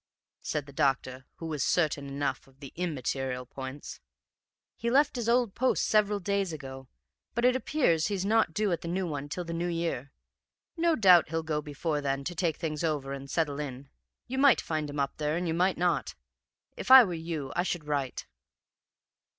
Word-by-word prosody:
F.,' - - -12
said 150 -2 -1
the 140 - -13
doctor, 130 -1 0
who 165 - -8
was 155 -3 -3
certain 150 -5 +1
enough 140 -1 -3
of 135 0 -24
the 140 -2 -10
immaterial 135 -6 -2
points. 130 +2 -8 0.8
'He 235 - -2
left 280 +4 +3
his 235 -2 -2
old 240 -4 +2
post 260 +1 +1
several 210 -1 +2
days 200 -1 -1
ago, 135 -3 -8 0.5
but 235 +1 +1
it 250 0 +5
appears 255 - +1
he's 195 -2 -2
not 220 +2 +3
due 210 -2 0
at 170 - -1
the - - -6
new 185 +2 -1
one 145 -3 -4
till 180 +5 -3
the 170 - -5
New 170 +1 -1
Year. 165 -6 -2 0.6
No 335 -1 +2
doubt 180 - +6
he'll 165 0 -2
go 155 -1 -1
before 150 +1 -3
then 140 -1 -1
to 175 - -4
take 170 -2 -1
things 155 -2 -3
over 145 -4 -1
and 140 0 -7
settle 150 -2 -1
in. 135 -2 -6 0.4
You 260 +2 -3
might 280 -2 +6
find 155 -2 -3
him 145 0 -5
up 140 0 -1
there 150 +1 -1
and 175 0 -2
you 160 - 0
might 180 +3 +2
not. 175 -1 0 0.6
If - - -6
I 260 -1 +11
were 185 -5 -3
you 160 -4 -4
I - - +2
should 175 -3 -3
write.' 140 -4 -2
160 Hz, 200 wpm, -29 LUFS, 140-190 Hz, 0.8 s, I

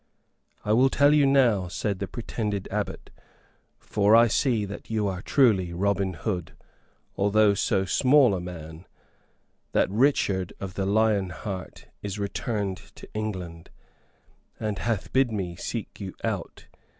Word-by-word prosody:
"I 105 - +2
will 130 +4 +5
tell 145 +2 +4
you 145 -2 +5
now," 120 -9 +3
said 95 +2 -3
the 100 - -3
pretended 105 -2 -4
abbot, - - -4 0.7
"for 105 +1 +2
I 115 +1 +7
see 115 -2 +1
that 100 +1 -9
you 110 -2 0
are 95 -1 -3
truly 100 -11 +3
Robin 95 0 0
Hood, 90 0 -4 0.6
although 100 +1 +3
so 100 -1 +1
small 130 +2 +4
a 90 - -2
man, 80 -1 -9 0.9
that - - +2
Richard 100 -6 +1
of 95 -2 -6
the 95 0 -2
Lion 105 -2 +2
Heart 95 0 -7 0.2
is 100 0 -5
returned 100 -1 -2 0.2
to - - -12
England, 90 -6 -5 0.9
and 105 -3 -3
hath 115 -5 -2
bid 130 -2 +3
me 95 -5 -3
seek 110 +5 -6
you 95 -3 -6
out. 100 -6 -4
100 Hz, 140 wpm, -26 LUFS, 95-110 Hz, 0.9 s, I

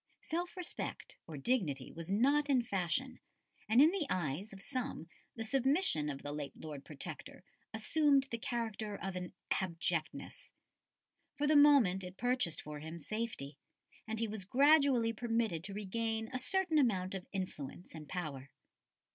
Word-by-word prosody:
Self 345 +3 -3
respect 360 -1 -5
or 155 -3 -6
dignity 145 - 0
was 165 +1 -8
not 280 +8 +3
in 260 -3 +4
fashion, 220 +6 -1 0.5
and 225 +3 +5
in 305 +4 +8
the 360 -6 -1
eyes 175 +4 -1
of 195 - -10
some 255 - -4 0.3
the 225 - -3
submission 265 - +2
of 140 -1 -5
the 145 - -4
late 145 -1 -5
Lord 150 -3 -7
Protector 155 +4 -7 0.3
assumed 280 +5 +3
the 230 - -2
character 225 -3 -3
of 195 -1 -4
an 180 -1 -4 0.2
"abjectness." 170 -3 -2 0.9
For 290 - +1
the 305 +1 +4
moment 275 -11 +6
it 180 +1 -8
purchased 245 -9 0
for 150 -1 -6
him 160 +3 -7
safety, 170 -7 -4 0.5
and 220 0 -2
he 230 - +1
was 210 -2 -5
gradually 270 0 +5
permitted 225 -7 0
to 200 - -5
regain 225 +2 -2
a 255 - 0
certain 345 +3 +2
amount 190 -8 +2
of 190 -2 -5
influence 185 -4 -5
and 155 -2 -9
power. 145 -7 -4
215 Hz, 155 wpm, -35 LUFS, 170-255 Hz, 0.9 s, in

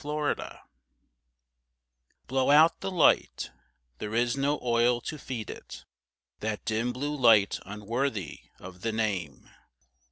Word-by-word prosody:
BURNED 150 0 -1
OUT - - -8 1.7
Blow 130 +1 0
out 155 +3 +6
the 195 - -3
light: 175 -5 +2 0.5
there 105 +1 -4
is 120 +1 +2
no 140 +2 0
oil 120 0 +3
to 155 - -6
feed 120 -5 -5
it: - - -11 0.5
That 110 -1 -4
dim 115 +3 0
blue 145 +4 -3
light 115 -7 +4
unworthy 105 - -3 0.2
of 90 0 -12
the 115 - -1
name. 95 - -2
120 Hz, 125 wpm, -28 LUFS, 105-140 Hz, 1.7 s, out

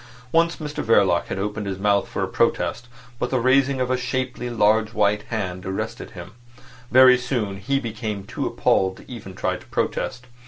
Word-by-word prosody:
Once 170 +1 +3
Mr 150 -1 -5
Verloc 95 -6 +3
had - - -4
opened 105 +1 -3
his 95 -1 -3
mouth 100 0 +2
for - - -3
a - - -1
protest, 120 - 0 0.3
but 125 - -1
the 130 - +1
raising 130 +2 +3
of 125 0 0
a 130 - +2
shapely, 125 -1 -3
large 110 -1 +2
white 105 0 +2
hand 95 -5 -3
arrested 95 0 -4
him. 90 +2 -8 0.6
Very 130 0 +7
soon 120 -6 -2
he 135 +8 0
became 110 -4 -4
too 100 - -4
appalled 95 0 +1
to - - -14
even 100 -7 -9
try - - -1
to - - -16
protest. 125 0 -2
110 Hz, 185 wpm, -23 LUFS, 100-130 Hz, 0.6 s, Very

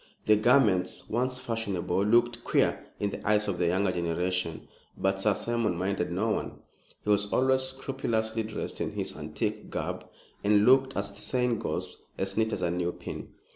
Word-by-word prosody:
The 110 - +6
garments, 105 -4 +3
once 125 +3 0
fashionable, 100 -6 -1
looked 120 +2 +3
queer - - +1
in 100 -1 0
the - - -7
eyes 105 0 +3
of 90 -3 -2
a 85 - +3
younger 95 +2 +2
generation; 85 0 -2 0.3
but 95 0 0
Sir 105 0 +3
Simon 115 -6 0
minded 95 -1 -1
no 100 +6 0
one. - - -2 0.5
He - - -4
was 100 0 +2
always 130 0 +3
scrupulously 130 -4 -1
dressed 110 -1 -5
in - - -2
his - - -3
antique - - -3
garb, - - -4 0.4
and 105 0 +4
looked, 135 +1 +5
as 100 0 -1
the 100 - -10
saying 125 -3 0
goes, - - -3 0.2
as 95 0 -2
neat 110 0 +1
as 95 -4 -2
a 85 - +1
new 90 0 -1
pin. - - -8
105 Hz, 175 wpm, -29 LUFS, 95-120 Hz, 0.5 s, The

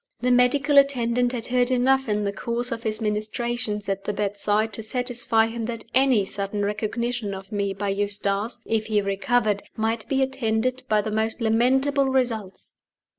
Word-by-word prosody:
The 250 +1 +2
medical 280 +4 +5
attendant 245 -3 +2
had 240 -2 -4
heard 250 0 +1
enough 260 0 +2
in 210 0 0
the 200 0 -1
course 235 +4 -2
of 230 - -3
his 220 -1 -3
ministrations 215 0 -2
at 195 0 -2
the 205 - -1
bedside, 205 +2 0
to 225 - -6
satisfy 235 -1 +1
him 225 0 -4
that 230 -1 -5
any 260 -6 +4
sudden 200 +1 -3
recognition 215 +1 -2
of 195 +2 -10
me 200 -1 -1
by 200 +1 -3
Eustace 205 +3 -1
(if 220 -1 -1
he 215 -1 +2
recovered) 210 +1 +1
might 220 0 -2
be 270 -1 +2
attended 255 -1 -1
by 215 -1 +3
the 215 - -3
most 220 +2 0
lamentable 265 +5 +2
results. 230 -7 -2
225 Hz, 170 wpm, -24 LUFS, 210-245 Hz, -, medical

